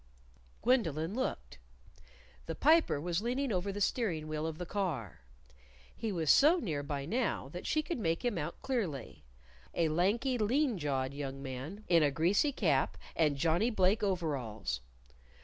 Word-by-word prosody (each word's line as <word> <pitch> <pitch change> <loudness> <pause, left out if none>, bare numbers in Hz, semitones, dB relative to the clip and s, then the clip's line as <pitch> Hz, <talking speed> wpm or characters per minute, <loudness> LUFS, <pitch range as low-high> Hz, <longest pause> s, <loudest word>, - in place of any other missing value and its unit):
_" - - -31
Gwendolyn 180 - +1
looked. 260 +3 -3 0.9
The - - -3
Piper 315 - +4
was 170 +4 -1
leaning 250 +3 -1
over 190 +1 -1
the 200 - -5
steering 185 -8 0
wheel 155 +1 -2
of 160 -1 -5
the 180 - -4
car. 170 - -3 0.8
He 225 - -3
was 165 -5 +2
so 310 +6 +6
near 160 - -2
by 140 -1 -4
now 225 - -1
that 175 +5 -7
she 310 - +1
could 335 -4 -3
make 165 0 -1
him 240 -4 +1
out 150 +3 -5
clearly 180 - -3 0.5
a 165 -2 +2
lanky, 220 - +1
lean 245 +1 +1
jawed 135 -3 -1
young 135 -1 -5
man 135 +10 -6
in 170 -2 +5
a 150 - +4
greasy 175 - +2
cap 155 - +1 0.2
and 150 -4 +2
Johnnie 170 - +2
Blake 205 0 +2
overalls. 130 - -2
175 Hz, 160 wpm, -32 LUFS, 145-225 Hz, 0.9 s, so